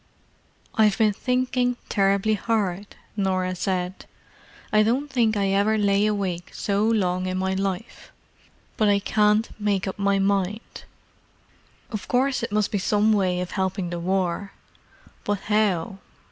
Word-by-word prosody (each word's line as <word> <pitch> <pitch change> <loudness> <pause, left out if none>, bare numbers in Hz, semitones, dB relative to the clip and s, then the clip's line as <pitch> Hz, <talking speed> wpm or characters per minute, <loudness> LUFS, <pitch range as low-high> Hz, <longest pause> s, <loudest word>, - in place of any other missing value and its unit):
"I've 215 -2 +3
been 215 -2 +3
thinking 250 +1 0
terribly 200 +1 +2
hard," 205 -2 -2 0.2
Norah 185 -2 0
said. 185 0 -3 0.7
"I 215 - +6
don't 255 +7 0
think 230 -4 +2
I 200 -1 +1
ever 200 +3 +2
lay 200 0 +2
awake 190 -4 -2
so 200 0 0
long 185 -5 +1
in 185 0 -2
my 190 0 0
life. 195 +2 -4 0.7
But 215 -2 +3
I 200 - +4
can't 210 +2 +2
make 205 -2 0
up 190 - -5
my 200 0 +2
mind. 195 +2 -1 1.1
Of 215 -4 -5
course 260 +2 +1
it 230 - -4
must 210 -1 +1
be 205 - 0
some 210 +2 +2
way 185 -3 +1
of 180 - -5
helping 190 -2 -2
the 175 - -3
War. 185 +2 -1 0.7
But 205 -1 -2
how? 205 -2 0
200 Hz, 145 wpm, -24 LUFS, 190-215 Hz, 1.1 s, I